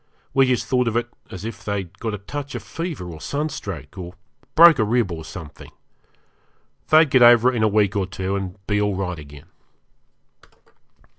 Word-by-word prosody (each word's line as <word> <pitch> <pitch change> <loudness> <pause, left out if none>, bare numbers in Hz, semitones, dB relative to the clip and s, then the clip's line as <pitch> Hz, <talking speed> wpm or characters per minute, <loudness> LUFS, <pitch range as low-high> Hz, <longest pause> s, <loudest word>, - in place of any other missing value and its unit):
We 135 -1 +4
just 125 -1 0
thought 125 -1 +1
of 115 0 0
it 120 0 -2 0.2
as 95 +3 -8
if 105 -4 -7
they'd 100 -4 -4
got 110 -2 -3
a - - -6
touch 140 +8 -7
of - - -5
fever 165 - -5
or 80 -1 -10
sunstroke, 100 - -5
or 90 0 -8 0.4
broke 165 -4 +8
a - - +4
rib 110 -2 +1
or 80 -1 -6
something. 80 -2 -10 1.2
They'd 155 -2 +5
get 130 - +4
over 120 +1 +7
it - - -4
in 115 - 0
a 110 - +4
week 105 -1 +2
or 95 -2 0
two, 95 0 -3
and 95 -1 -5
be 105 -1 0
all 105 -1 0
right 90 -3 -3
again. 70 -1 -12
105 Hz, 190 wpm, -22 LUFS, 95-125 Hz, 1.2 s, broke